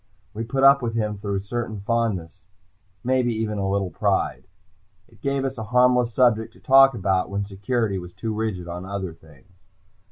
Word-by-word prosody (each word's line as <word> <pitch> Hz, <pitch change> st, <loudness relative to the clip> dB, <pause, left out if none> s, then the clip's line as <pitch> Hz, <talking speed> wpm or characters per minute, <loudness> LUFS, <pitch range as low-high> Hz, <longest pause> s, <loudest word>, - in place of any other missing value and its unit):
We 110 Hz, +2 st, -4 dB
put 135 Hz, +3 st, -1 dB
up 140 Hz, 0 st, +7 dB
with 115 Hz, -2 st, -3 dB
him 105 Hz, -2 st, -2 dB
through 100 Hz, -1 st, -3 dB
a -, -, 0 dB
certain 110 Hz, -1 st, -4 dB
fondness, 100 Hz, -6 st, -2 dB, 0.6 s
maybe 125 Hz, -2 st, +1 dB
even 110 Hz, -1 st, -2 dB
a 95 Hz, 0 st, -1 dB
little 95 Hz, -2 st, -1 dB
pride. -, -, -1 dB, 0.6 s
It -, -, -23 dB
gave 140 Hz, -1 st, -1 dB
us 135 Hz, -2 st, -4 dB
a 110 Hz, -, -4 dB
harmless 125 Hz, +1 st, +3 dB
subject 115 Hz, -2 st, +2 dB
to -, -, -19 dB
talk 135 Hz, 0 st, +6 dB
about 95 Hz, -3 st, 0 dB
when 100 Hz, 0 st, -2 dB
security 100 Hz, +1 st, -2 dB
was 90 Hz, 0 st, -10 dB
too 110 Hz, -2 st, -3 dB
rigid 105 Hz, -5 st, -3 dB
on 90 Hz, +1 st, -6 dB
other 95 Hz, -2 st, -5 dB
things. 80 Hz, +3 st, -21 dB
110 Hz, 185 wpm, -23 LUFS, 95-120 Hz, 0.6 s, up